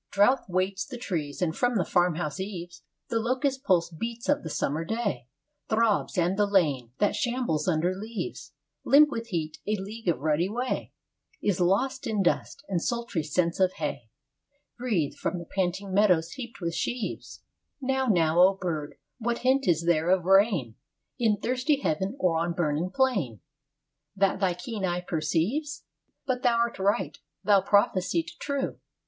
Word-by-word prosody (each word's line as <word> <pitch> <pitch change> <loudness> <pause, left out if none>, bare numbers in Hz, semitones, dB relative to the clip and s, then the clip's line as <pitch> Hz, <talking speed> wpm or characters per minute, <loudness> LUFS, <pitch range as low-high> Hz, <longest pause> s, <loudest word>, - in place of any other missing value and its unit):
II - - -26
Drouth 255 0 +2
weights 185 +2 0
the 255 - -8
trees, 165 - -3
and 160 -2 0
from 245 -1 +1
the 185 -5 +2
farm 175 -2 +2
house 160 0 -3
eaves 175 -3 -6 0.3
The 230 - +1
locust, 260 +3 0
pulse 175 -5 +2
beat 230 - -5
of 290 - +3
the 160 - -6
summer 150 +1 -1
day, 205 - -2 0.4
Throbs; 220 -3 +1
and 180 +3 +1
the 205 - +4
lane, 145 - +1
that 205 0 +2
shambles 235 -9 -1
under 175 +1 +2
leaves 220 - -6 0.3
Limp 295 +2 +6
with 230 -3 -3
the 205 -7 -2
heat 155 -1 -4
a 215 - +2
league 210 +3 -8
of 170 - +3
rutty 155 +4 +1
way 245 +4 -2 0.5
Is 200 -4 0
lost 220 +10 +1
in 210 -3 +1
dust; 275 +9 -1
and 180 -4 -1
sultry 235 -7 -1
scents 170 +3 0
of 185 -1 +3
hay 140 -7 -4 0.7
Breathe 215 - -1
from 180 - -3
the 170 - -7
panting 190 +2 -2
meadows 180 -5 +3
heaped 240 -4 -8
with 170 -1 -2
sheaves 240 +6 -4 0.4
Now, 265 -1 0
now, 170 -5 +3
O 190 +2 +6
bird, 160 -6 -4 0.2
what 235 +1 -2
hint 270 +1 +3
is 165 -1 +2
there 170 0 +2
of 185 -2 +3
rain, 195 - +4 0.5
In 220 -3 +3
thirsty 255 +6 0
heaven 190 - -1
or 165 -3 +2
on 170 +1 -1
burning 165 0 0
plain, 190 - 0 0.7
That 195 -1 +2
thy 185 -3 +1
keen 200 +3 -5
eye 175 -1 0
perceives? 180 - -1
III - - -51
But 255 -2 -1
thou 240 -2 +3
art 235 -2 0
right. 190 -5 0 0.2
Thou 200 -2 +5
prophesiest 185 -4 +1
true. 280 -1 -2
190 Hz, 170 wpm, -27 LUFS, 170-235 Hz, 0.7 s, Limp